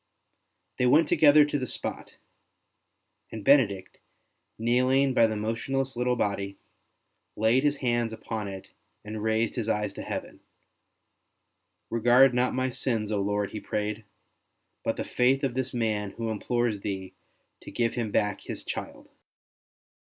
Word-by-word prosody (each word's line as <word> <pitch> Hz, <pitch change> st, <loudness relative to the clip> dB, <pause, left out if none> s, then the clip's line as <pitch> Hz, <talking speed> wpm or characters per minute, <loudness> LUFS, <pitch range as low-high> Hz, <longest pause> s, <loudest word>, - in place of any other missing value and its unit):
They 125 Hz, -, +3 dB
went 150 Hz, +5 st, +5 dB
together 150 Hz, -1 st, +6 dB
to 145 Hz, -1 st, -2 dB
the 130 Hz, -, -3 dB
spot, -, -, -6 dB, 1.1 s
and 110 Hz, -2 st, -7 dB
Benedict, 100 Hz, -10 st, +3 dB, 0.6 s
kneeling 130 Hz, +4 st, +2 dB
by 115 Hz, -2 st, +5 dB
the 110 Hz, -, -3 dB
motionless 125 Hz, +5 st, -2 dB
little 125 Hz, +1 st, +1 dB
body, 100 Hz, -3 st, -2 dB, 0.8 s
laid 115 Hz, +5 st, +3 dB
his 145 Hz, -1 st, +2 dB
hands 120 Hz, -3 st, 0 dB
upon 110 Hz, -1 st, -5 dB
it 95 Hz, -1 st, -8 dB, 0.4 s
and 105 Hz, 0 st, -5 dB
raised 110 Hz, +1 st, +1 dB
his 115 Hz, -3 st, -3 dB
eyes 105 Hz, -2 st, -1 dB
to -, -, -7 dB
Heaven. -, -, -6 dB, 0.8 s
" -, -, -51 dB
Regard 120 Hz, +3 st, +5 dB
not 125 Hz, +1 st, +1 dB
my 130 Hz, 0 st, 0 dB
sins, 115 Hz, -4 st, -1 dB
Lord," 105 Hz, 0 st, -1 dB
he 110 Hz, -, -5 dB
prayed, 105 Hz, +1 st, -3 dB, 0.4 s
" -, -, -50 dB
but -, -, -1 dB
the -, -, -2 dB
faith 130 Hz, +3 st, +2 dB
of 135 Hz, -3 st, 0 dB
this 130 Hz, 0 st, -2 dB
man 110 Hz, -4 st, -1 dB
who 115 Hz, -1 st, -2 dB
implores 120 Hz, 0 st, -1 dB
Thee 95 Hz, -2 st, -5 dB, 0.5 s
to -, -, -10 dB
give 115 Hz, -1 st, 0 dB
him 115 Hz, -3 st, -2 dB
back 105 Hz, 0 st, 0 dB
his -, -, -7 dB
child." -, -, -6 dB
115 Hz, 145 wpm, -27 LUFS, 105-130 Hz, 1.1 s, together